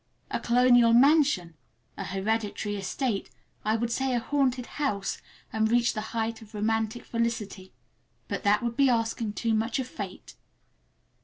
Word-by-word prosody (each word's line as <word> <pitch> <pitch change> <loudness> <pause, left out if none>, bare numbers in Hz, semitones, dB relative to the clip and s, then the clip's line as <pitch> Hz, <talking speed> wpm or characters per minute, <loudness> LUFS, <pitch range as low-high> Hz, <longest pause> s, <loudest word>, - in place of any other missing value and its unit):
A - - -1
colonial 245 -1 +5
mansion, 270 - +4 0.4
a - - -5
hereditary 205 +2 -2
estate, 205 +2 -2 0.3
I 215 +1 +1
would 235 +1 -1
say 265 +1 0
a - - +2
haunted 260 -1 0
house, 210 -11 -2 0.3
and 220 0 +2
reach 240 +1 +3
the 215 - -3 0.2
height 225 0 -2
of 215 0 -13
romantic 220 +2 -1
felicity—but 225 -5 -5
that 205 +2 +3
would 235 -1 -2
be 275 0 +4
asking 225 -2 0
too 230 +1 -1
much 225 +4 0
of 260 -2 -2
fate! 200 -6 -8
225 Hz, 145 wpm, -27 LUFS, 210-245 Hz, 0.4 s, colonial